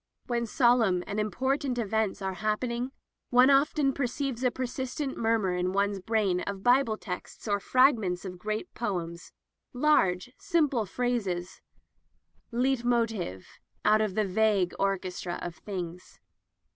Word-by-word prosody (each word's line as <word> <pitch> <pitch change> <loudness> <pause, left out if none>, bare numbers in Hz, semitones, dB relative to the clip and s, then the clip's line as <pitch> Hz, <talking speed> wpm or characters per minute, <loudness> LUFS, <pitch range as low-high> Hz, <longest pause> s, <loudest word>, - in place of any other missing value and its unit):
When 235 -1 -1
solemn 225 -7 +3
and 210 0 -3
important 260 +4 -1
events 220 -3 -1
are 190 0 -1
happening, 235 +4 -1 0.4
one 250 +2 +6
often 275 0 +3
perceives 265 -1 -2
a 250 - +4
persistent 260 +3 -4
murmur 225 -5 +1
in 180 +1 -1
one's 200 0 +1
brain 200 -3 +1
of 195 +1 -5
Bible 245 -3 +3
texts 180 +3 -7
or 205 -1 +1
frag 255 +3 +4
ments 180 -2 -3
of 180 -1 -7
great 215 +2 -4
poems 175 -6 -4 0.3
— - - -54
large, 245 -7 +2
simple 300 - +1
phrases 195 -6 -2 0.4
— - - -43
Leitmotive 235 - 0 0.4
out 215 +1 +5
of 210 -3 -1
the 215 - +2
vague 200 -2 +2
orchestra 185 -2 -2
of 175 -1 -6
things. 180 -3 -7
220 Hz, 135 wpm, -28 LUFS, 190-250 Hz, 0.4 s, one